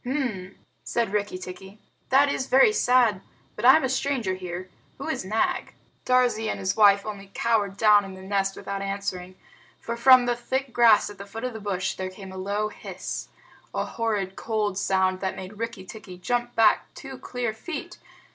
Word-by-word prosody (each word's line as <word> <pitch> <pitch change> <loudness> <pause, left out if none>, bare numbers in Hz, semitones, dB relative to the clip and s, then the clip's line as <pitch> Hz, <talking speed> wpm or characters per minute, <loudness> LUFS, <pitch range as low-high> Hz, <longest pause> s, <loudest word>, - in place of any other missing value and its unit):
"H'm!" 240 -9 -3 0.3
said 230 -4 -1
Rikki 205 -2 -1
tikki, 185 +2 -10 0.3
"that 275 +2 +5
is 270 -2 -2
very 270 +11 +5
sad 245 - +3 0.3
but - - -7
I 260 - +9
am 315 - +2
a - - +2
stranger 260 -6 -1
here. 180 0 -6 0.3
Who - - -6
is - - -2
Nag?" 215 +4 -1 0.3
Darzee 245 -3 +2
and - - -2
his 190 0 -1
wife 200 -2 +5
only 200 -2 -7
cowered 210 -4 +1
down 210 -1 +6
in 195 -1 -8
the 190 - -11
nest 195 0 0
without 200 0 -5
answering, 195 -2 -4 0.4
for 235 - -4
from 255 +1 +7
the 240 0 +1
thick 260 +2 -3
grass 225 -4 +5
at 200 - -14
the 200 - -8
foot 225 +3 -8
of 250 -1 -3
the 220 - -7
bush 190 -2 -2
there 185 0 -4
came 190 0 -10
a 190 - -9
low 205 +3 -1
hiss - - -6 0.5
a - - 0
horrid 205 -5 -2
cold 215 -3 -1
sound 190 -1 +1
that 190 -1 -2
made 190 +3 -9
Rikki 230 -5 -5
tikki 190 -3 -10
jump 240 +5 -2
back 220 -2 +3
two 270 -2 -9
clear 245 -3 -3
feet. 290 +8 -7
210 Hz, 190 wpm, -25 LUFS, 190-240 Hz, 0.5 s, I